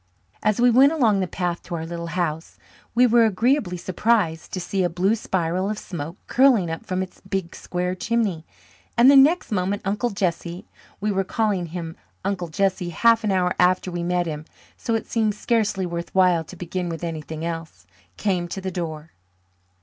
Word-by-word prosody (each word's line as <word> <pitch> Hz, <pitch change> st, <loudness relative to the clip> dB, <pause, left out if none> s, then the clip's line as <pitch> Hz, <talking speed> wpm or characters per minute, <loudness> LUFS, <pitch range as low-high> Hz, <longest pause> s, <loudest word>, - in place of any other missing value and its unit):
As 215 Hz, 0 st, +1 dB
we 245 Hz, 0 st, +5 dB
went 265 Hz, +5 st, +6 dB
along 230 Hz, -11 st, +3 dB
the 185 Hz, -, 0 dB
path 175 Hz, -1 st, -2 dB
to 175 Hz, -, -6 dB
our 160 Hz, -1 st, -4 dB
little 170 Hz, 0 st, -5 dB
house 160 Hz, -2 st, -2 dB, 0.4 s
we 250 Hz, +1 st, +6 dB
were 235 Hz, -1 st, +5 dB
agreeably 220 Hz, -2 st, +1 dB
surprised 180 Hz, -2 st, 0 dB
to 185 Hz, -, -3 dB
see 190 Hz, +2 st, -2 dB
a 175 Hz, -, +1 dB
blue 180 Hz, +5 st, +1 dB
spiral 185 Hz, -3 st, -1 dB
of 215 Hz, -, -2 dB
smoke 170 Hz, -3 st, -6 dB
curling 240 Hz, -10 st, +4 dB
up 165 Hz, -, -6 dB
from 185 Hz, 0 st, -1 dB
its 185 Hz, -, -11 dB
big, 190 Hz, -3 st, -3 dB
square 180 Hz, 0 st, -3 dB
chimney, 200 Hz, -4 st, -1 dB, 0.5 s
and 245 Hz, +3 st, +8 dB
the -, -, +6 dB
next 290 Hz, +4 st, +5 dB
moment 200 Hz, +1 st, -1 dB
Uncle 210 Hz, +5 st, 0 dB
Jesse 180 Hz, -1 st, -3 dB, 0.3 s
(we 210 Hz, +1 st, 0 dB
were 195 Hz, -1 st, +1 dB
calling 200 Hz, -3 st, 0 dB
him 165 Hz, -1 st, -6 dB, 0.3 s
Uncle 190 Hz, -3 st, -1 dB
Jesse 185 Hz, +2 st, 0 dB
half 230 Hz, +6 st, +3 dB
an 210 Hz, -, +1 dB
hour 180 Hz, -1 st, +2 dB
after 180 Hz, +1 st, +3 dB
we 175 Hz, 0 st, -3 dB
met 175 Hz, 0 st, 0 dB
him, 155 Hz, -2 st, -5 dB, 0.3 s
so 230 Hz, -, -2 dB
it 225 Hz, -, -2 dB
seems 215 Hz, -3 st, 0 dB
scarcely 215 Hz, -5 st, 0 dB
worthwhile 175 Hz, 0 st, +1 dB
to 185 Hz, -, -11 dB
begin 180 Hz, 0 st, -4 dB
with 165 Hz, 0 st, -5 dB
anything 160 Hz, -1 st, -5 dB
else) 165 Hz, -, -6 dB, 0.3 s
came 180 Hz, -4 st, 0 dB
to 185 Hz, -, -5 dB
the 190 Hz, 0 st, -4 dB
door. 160 Hz, -3 st, -5 dB
185 Hz, 185 wpm, -23 LUFS, 170-215 Hz, 0.5 s, and